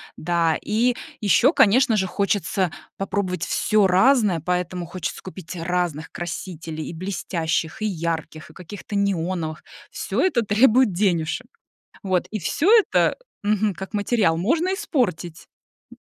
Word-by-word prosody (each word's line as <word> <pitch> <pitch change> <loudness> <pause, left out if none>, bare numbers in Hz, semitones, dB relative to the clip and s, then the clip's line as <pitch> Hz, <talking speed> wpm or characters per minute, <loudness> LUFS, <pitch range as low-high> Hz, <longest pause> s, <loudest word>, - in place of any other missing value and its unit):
Да, 165 -1 +1
и 235 +3 +1 0.2
ещё, 210 +6 +4
конечно 235 - +4
же, 190 -2 +1
хочется 195 -2 0 0.3
попробовать 190 -3 -2
всё 210 -3 +2
разное, 205 -2 +4
поэтому 180 0 -2
хочется 175 -1 -5
купить 185 -1 -8
разных 170 -2 -2
красителей, 165 -2 -6
и - - -6
блестящих, 170 0 -3
и - - 0
ярких, 160 -3 -4
и - - -19
каких-то 200 +3 -8
неоновых. 175 -5 -1 0.3
Всё - - -2
это 285 -11 +2
требует 220 +1 +4
денежек. 175 +4 0 0.6
Вот, 185 -2 0
и 215 - -3
всё 285 - 0
это, 450 -3 +4 0.3
мгм, 210 -1 +1
как 190 +4 -8
материал 205 -5 +1
можно 320 - +1
испортить. 185 - -2 0.5
М. - - -14
185 Hz, 130 wpm, -23 LUFS, 170-215 Hz, 0.6 s, ещё